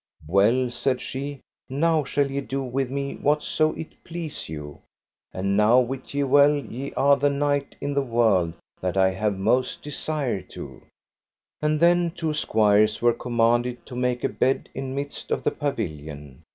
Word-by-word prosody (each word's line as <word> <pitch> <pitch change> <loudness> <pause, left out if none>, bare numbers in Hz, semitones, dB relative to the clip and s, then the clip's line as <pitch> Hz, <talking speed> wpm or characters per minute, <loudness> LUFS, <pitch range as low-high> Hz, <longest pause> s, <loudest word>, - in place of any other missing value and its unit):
Well, 110 +9 +3
said 125 +1 0
she, 140 +1 -5 0.3
now 155 +3 +2
shall 140 0 0
ye 140 +1 -1
do 135 0 -3
with 130 0 -2
me 140 +1 -3
whatso 155 +1 +1
it 160 - -9
please 165 - -6
you; 75 -2 -8 0.5
and 100 +1 -1
now 110 +4 +5
wit 130 +2 -3
ye 145 - +2
well 140 +2 +5
ye 140 -1 -5
are 140 +1 +4
the 145 +1 +2
knight 145 0 0
in 145 0 -2
the 140 - +2
world 110 -9 +2 0.3
that 90 0 -2
I 95 0 +4
have 100 +1 -1
most 125 +6 +1
desire 145 -7 -2
to. - - -10 0.8
And 150 0 +1
then 175 +1 +4
two 165 -2 -3
squires 110 -6 +3
were 120 0 +4
commanded 120 +1 0
to 125 - -9
make 125 0 -1
a - - +2
bed 135 - 0
in 135 0 -4
midst 140 +1 -5
of - - -1
the - - +2
pavilion. 75 - -5
130 Hz, 165 wpm, -25 LUFS, 110-145 Hz, 0.8 s, now